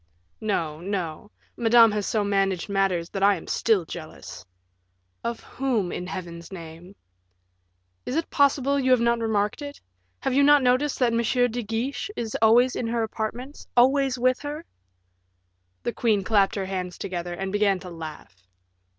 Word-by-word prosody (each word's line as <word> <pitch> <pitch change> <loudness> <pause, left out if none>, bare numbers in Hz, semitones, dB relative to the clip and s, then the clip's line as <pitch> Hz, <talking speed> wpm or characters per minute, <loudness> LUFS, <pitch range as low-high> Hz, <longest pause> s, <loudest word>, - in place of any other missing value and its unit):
"No, 165 -8 -1
no. 185 0 -4 0.3
Madame 230 -1 +6
has 210 -1 -2
so 215 -2 +1
managed 195 -3 0
matters, 190 -4 0
that 195 - -4
I 200 0 +5
am 170 - -9
still 210 -7 +1
jealous." 160 -1 -9 0.8
"Of 235 -1 -3
whom, 240 -9 -1
in 180 - -5
Heaven's 170 -2 -7
name?" 170 +1 -10 1.1
"Is 255 - -2
it 325 +1 -2
possible 280 -1 +3
you 260 -1 0
have 255 -1 +5
not 235 0 +2
remarked 215 +2 0
it? 285 0 -7 0.4
Have - - -1
you 275 - +4
not 290 -1 +6
noticed 255 +3 +2
that 245 -3 +2
M. 230 - +2 0.3
de 245 +2 -3
Guiche 230 - -3
is 225 -2 -4
always 240 +3 +5
in 235 - -2
her 230 0 0
apartments 235 +5 -5
always 265 +1 +4
with 255 +1 +2
her?" 295 +3 -6 1.2
The 240 - -2
queen 215 -4 +1
clapped 200 -1 +2
her 195 -2 -2
hands 185 -2 -4
together, 175 -1 -4
and 190 +1 -4
began 205 -1 +2
to 180 - -9
laugh. 155 - -9
220 Hz, 160 wpm, -25 LUFS, 190-250 Hz, 1.2 s, Madame